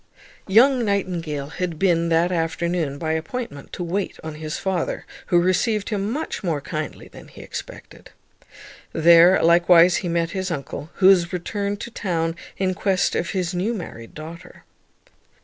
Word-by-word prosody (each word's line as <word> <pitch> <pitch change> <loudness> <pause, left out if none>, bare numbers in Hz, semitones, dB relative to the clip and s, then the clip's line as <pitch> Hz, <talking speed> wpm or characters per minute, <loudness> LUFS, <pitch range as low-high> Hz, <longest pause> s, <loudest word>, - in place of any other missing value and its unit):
Young 245 +5 +5
Nightingale 175 -8 -2
had 175 -3 -2
been 170 -2 +2
that 170 +2 +2
afternoon, 165 -3 -1
by 160 +1 -2
appointment, 160 - -5
to 180 - -4
wait 185 +4 -3
on 160 -1 -5
his 155 0 -5
father, 190 -3 -2 0.2
who 175 - +4
received 200 +4 +1
him 205 -2 -1
much 285 0 -4
more 165 -5 0
kindly 155 +1 -6
than - - -14
he - - -13
expected. - - -9 0.8
There 170 +3 +6
likewise 175 +1 +6
he 175 - -3
met 170 0 0
his 190 -1 -3
uncle, 150 -1 -5
who 190 - 0
was 180 -3 +6
returned 200 +3 -3
to 235 - -6
town 165 -6 -2 0.2
in 185 -1 0
quest 190 -1 +1
of 170 - -1
his 185 -2 -2
new 195 +7 -1
married 115 - -8
daughter. 165 +3 -10
175 Hz, 155 wpm, -22 LUFS, 165-195 Hz, 0.8 s, There